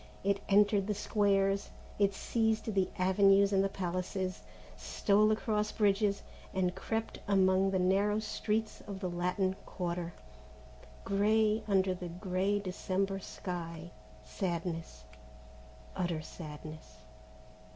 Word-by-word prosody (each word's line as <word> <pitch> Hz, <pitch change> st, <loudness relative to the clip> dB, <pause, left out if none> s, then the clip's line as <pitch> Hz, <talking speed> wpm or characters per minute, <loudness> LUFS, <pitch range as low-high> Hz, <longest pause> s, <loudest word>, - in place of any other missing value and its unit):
It 200 Hz, 0 st, +1 dB
entered 205 Hz, 0 st, +4 dB
the 210 Hz, -, 0 dB
squares, 200 Hz, -1 st, +1 dB, 0.3 s
it 200 Hz, -1 st, +3 dB
seized 220 Hz, 0 st, 0 dB
the 190 Hz, -1 st, +2 dB
avenues 195 Hz, +2 st, +4 dB
and 195 Hz, 0 st, +4 dB
the 195 Hz, -, +1 dB
palaces, 185 Hz, 0 st, -3 dB, 0.3 s
stole 210 Hz, 0 st, +2 dB
across 215 Hz, -1 st, 0 dB
bridges 205 Hz, -1 st, +2 dB, 0.3 s
and 180 Hz, -1 st, +1 dB
crept 225 Hz, +4 st, -3 dB
among 190 Hz, -1 st, +4 dB
the 190 Hz, -, +1 dB
narrow 195 Hz, +3 st, +2 dB
streets 215 Hz, 0 st, -2 dB
of 200 Hz, -2 st, -6 dB
the 185 Hz, -2 st, -2 dB
Latin 180 Hz, +2 st, 0 dB
Quarter, 175 Hz, -1 st, -3 dB, 0.9 s
grey 215 Hz, +2 st, +2 dB
under 190 Hz, -2 st, +3 dB
the 180 Hz, -1 st, -6 dB
grey 185 Hz, +3 st, 0 dB
of 200 Hz, -, -4 dB
the 185 Hz, -, -3 dB
December 195 Hz, +1 st, -1 dB
sky. 170 Hz, -3 st, -6 dB, 0.3 s
Sadness, 170 Hz, -, -4 dB, 0.9 s
utter 175 Hz, -4 st, -1 dB
sadness. 155 Hz, -7 st, -9 dB
195 Hz, 120 wpm, -32 LUFS, 180-205 Hz, 0.9 s, entered